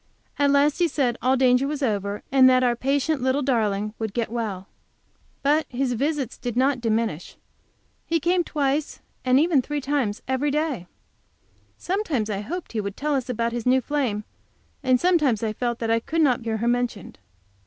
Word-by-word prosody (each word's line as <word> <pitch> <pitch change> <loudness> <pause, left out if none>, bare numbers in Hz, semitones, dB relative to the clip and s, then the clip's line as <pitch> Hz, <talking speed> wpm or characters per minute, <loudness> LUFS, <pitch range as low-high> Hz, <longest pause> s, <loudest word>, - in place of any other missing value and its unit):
At 285 0 +4
last 285 +2 +3
he 350 - +4
said 265 -6 0
all 260 +1 +2
danger 255 +1 +3
was 295 -1 -3
over, 205 -3 -1
and 260 -1 +7
that 255 0 +4
our 240 -1 +2
patient 275 +3 0
little 260 +3 +1
darling 215 -5 0
would 220 -2 -4
get 230 -2 -1
well. 210 -5 -4 0.8
But 300 +3 +2
his 250 0 -1
visits 275 0 -2
did 240 -2 -4
not 260 0 +2
diminish; 220 -7 -1 0.7
he 330 0 +1
came 350 +3 +2
twice 290 -1 -1 0.2
and 255 0 +4 0.3
three 295 +2 -3
times 265 -7 -1
every 260 +3 0
day. 285 - -1 0.9
Sometimes 325 - -1
I 195 - -2
hoped 345 - -6
he 220 - -2
would 200 -1 -6
tell 300 +1 -1
us 260 -2 -1
about 235 -1 -1
his 240 0 -4
new 260 +1 +5
flame, 255 -6 -2 0.6
and 255 -3 +3
sometimes 300 - +2
I 215 -1 -1
felt 240 +1 -2
that 225 -1 -2
I 230 - +3
could 320 +8 -1
not 255 -4 +2
hear 225 -1 -2
her 230 +2 -2
mentioned. 240 - -2
255 Hz, 180 wpm, -24 LUFS, 230-285 Hz, 0.9 s, and